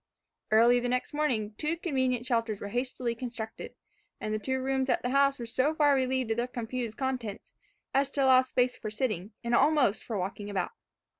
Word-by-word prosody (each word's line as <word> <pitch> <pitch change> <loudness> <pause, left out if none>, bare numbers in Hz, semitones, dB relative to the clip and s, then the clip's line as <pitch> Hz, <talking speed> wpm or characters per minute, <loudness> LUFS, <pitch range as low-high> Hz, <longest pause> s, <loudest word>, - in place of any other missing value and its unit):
Early 235 +3 +5
the 245 0 -2
next 250 +3 -1
morning, 245 -9 0
two 310 +2 0
convenient 260 -7 0
shelters 230 -4 0
were 200 - -5
hastily 245 +1 -2
constructed, 230 -2 -7 0.4
and 215 - -3
the 215 - 0
two 260 +4 -1
rooms 265 0 0
of - - +4
the 245 - -1
house 275 0 +4
were 235 - -5
so 260 +7 0
far 295 -2 +4
relieved 260 -3 +1
of 225 - 0
their 240 +1 0
confused 240 -2 -4
contents, 250 -6 -4 0.4
as 275 0 +2
to 280 -1 0
allow 260 -1 +7
space 255 -1 0
for 215 - -6
sitting, 215 -3 -2
and 235 0 -1
almost 270 -5 +3
for 225 - -3
walking 200 +2 -4
about. 195 -2 -2
250 Hz, 195 wpm, -29 LUFS, 225-265 Hz, 0.4 s, allow